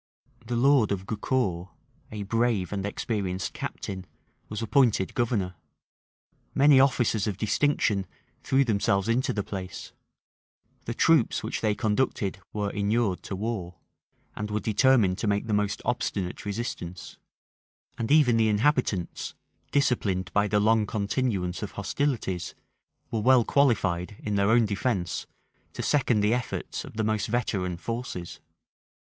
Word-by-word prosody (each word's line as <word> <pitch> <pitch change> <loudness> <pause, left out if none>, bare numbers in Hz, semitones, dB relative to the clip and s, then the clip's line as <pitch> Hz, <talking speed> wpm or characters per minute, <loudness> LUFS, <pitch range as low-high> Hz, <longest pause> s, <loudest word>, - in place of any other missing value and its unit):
The 120 - -2
lord 130 -3 +4
of 95 -1 -2
Gaucour, 100 -5 -1 0.4
a 105 -1 -4
brave 115 -2 0
and 100 0 -2
experienced 95 -4 -3
captain, 95 -2 -6 0.4
was 105 +1 -4
appointed 115 -7 +2
governor: 110 -7 0 1.0
many 140 -1 +6
officers 120 -5 +2
of 100 -3 -2
distinction 105 -3 +1 0.3
threw 135 +1 +3
themselves 100 -3 +1
into 120 +3 +1
the 100 - -2
place: 95 -2 -7 0.9
the 115 - -4
troops 160 -6 +3
which - - -3
they 105 -2 +1
conducted 105 -2 0
were 105 -1 -2
inured 100 -1 0
to 95 - -5
war, 95 -4 -4 0.6
and 105 0 -4
were 105 0 -1
determined 110 -2 +3
to 110 - -1
make 100 +1 +1
the 110 - -2
most 105 -1 0
obstinate 95 +1 -2
resistance: 100 -5 -5 0.8
and 115 +2 -3
even 140 -6 +5
the 110 -1 +3
inhabitants, 110 - 0 0.3
disciplined 100 - 0
by 105 0 +3
the 105 0 +2
long 110 0 +3
continuance 100 -4 -1
of 105 - -5
hostilities, 100 -5 -2 0.6
were 110 - -1
well 125 0 +5
qualified, 100 -9 +1
in 105 - -4
their 100 0 +2
own 115 0 +5
defence, 100 -4 -2 0.5
to - - -4
second 125 -7 +2
the 105 +2 +3
efforts 125 -1 -3
of - - -11
the 110 - +1
most 110 -1 0
veteran 100 -6 -1
forces. 115 -5 -5
105 Hz, 135 wpm, -27 LUFS, 100-120 Hz, 1.0 s, many